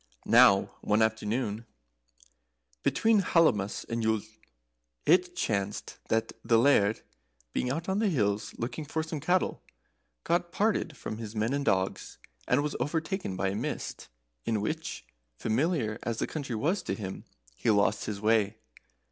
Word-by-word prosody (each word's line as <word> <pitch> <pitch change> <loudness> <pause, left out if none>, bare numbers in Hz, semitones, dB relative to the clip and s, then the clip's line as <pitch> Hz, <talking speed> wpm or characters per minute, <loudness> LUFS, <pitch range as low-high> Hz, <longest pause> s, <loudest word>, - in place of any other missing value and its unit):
] - - -33
Now 100 0 +6
one 105 +1 +3
afternoon, 110 +1 -1 1.1
between 225 - +3
Hallowmas 115 - +2
and 115 0 -2
Yule, 110 -2 +1 0.8
it 180 0 +4
chanced 100 - -2
that 115 0 0
the 115 - +4
Laird, 115 -4 +4 0.5
being 125 - 0
out 160 +5 -2
on 190 +1 +1
the 220 -2 +2
hills 105 - 0
looking 120 +6 -4
for 160 +2 -2
some 160 -1 -4
cattle, 175 +5 +1 0.6
got 175 0 0
parted 200 - 0
from 110 - -6
his 110 -1 -7
men 110 +4 0
and 140 0 0
dogs 95 -7 -1 0.3
and 140 +3 +3
was 150 - -2
overtaken 160 - -2
by 95 +1 0
a 95 - -3
mist, - - -4 0.4
in 110 -2 0
which, 155 - -4 0.3
familiar 115 - 0
as 115 -2 -3
the - - 0
country 140 -6 -4
was 170 - 0
to - - -3
him, 95 -3 -6 0.3
he 85 - -1
lost 100 0 +3
his 105 -2 -4
way. 110 0 +2
115 Hz, 150 wpm, -29 LUFS, 105-160 Hz, 1.1 s, Now